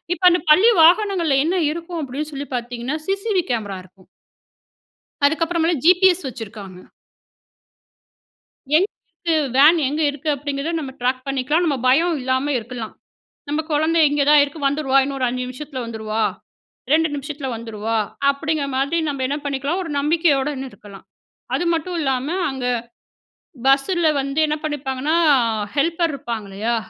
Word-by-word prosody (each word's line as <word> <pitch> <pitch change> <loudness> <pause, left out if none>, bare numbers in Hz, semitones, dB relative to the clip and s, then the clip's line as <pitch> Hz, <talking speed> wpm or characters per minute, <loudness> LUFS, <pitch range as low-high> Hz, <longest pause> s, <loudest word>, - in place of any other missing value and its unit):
இப்போ 370 - -17
அந்த 350 - +2
பள்ளி 380 +9 +7
வாகனங்கள்ல 345 -4 +4
என்ன 355 +3 0
இருக்கும் 335 +1 -6
அப்டீன்னு 290 +3 -5
சொல்லி 280 +1 -5
பாத்தீங்கன்னா? 245 +3 -4
சி.சி.டி.வி.கேமரா 360 - -1
இருக்கும். 185 0 -23 1.2
அதுக்கு 315 +4 +3
அப்புறமேல 335 0 0
ஜிபிஎஸ் 360 -1 +5
வச்சுருக்காங்க. 210 -6 -8 2.0
எங்க 310 - +6 0.3
இருக்கு? 335 -1 -3 0.2
வேன் 300 +5 +7
எங்க 300 +4 -2
இருக்கு? 290 +2 -5
அப்டிங்கிறத 285 +2 -3
நம்ப 270 -4 -6
ட்ராக் 255 +1 -1
பண்ணிக்கலாம். 275 +5 0
நம்ப 290 -4 0
பயம் 325 +6 +3
இல்லாம 260 +3 0
இருக்கலாம். 230 -1 -7 0.6
நம்ப 300 +2 0
குழந்தை 315 +3 +2
இங்கே 290 0 +1
தான் 300 -1 +7
இருக்கு 290 +2 -9
வந்துருவா 275 -1 +1
இன்னொரு 275 -1 -3
5 250 +1 -3
நிமிஷத்துல 260 +1 -7
வந்துருவா, 220 -1 -3 0.7
2 320 +1 +4
நிமிஷத்துல 285 -1 -5
வந்துருவா 225 -1 -4 0.3
அப்படிங்குற 300 +1 -2
மாதிரி 280 +5 0
நம்ப 280 -2 -4
என்ன 280 +3 -2
பண்ணிக்கலாம்? 285 +5 -2
ஒரு 335 - -6
நம்பிக்கையோடன்னு 290 -3 +1
இருக்கலாம். 200 -2 -14 0.5
அது 350 - -1
மட்டும் 340 +2 -2
இல்லாம, 265 -2 -1 0.2
அங்க 265 -2 -5 1.0
பஸ்ல 285 +6 +3
வந்து 275 +2 -2
என்ன 300 - 0
பண்ணிப்பாங்கன்னா, 290 0 -2 0.6
ஹெல்ப்பர் 330 +3 +1
இருப்பாங்க 235 -6 -5
இல்லயா? 215 +5 -2
285 Hz, 135 wpm, -21 LUFS, 255-325 Hz, 2.0 s, பள்ளி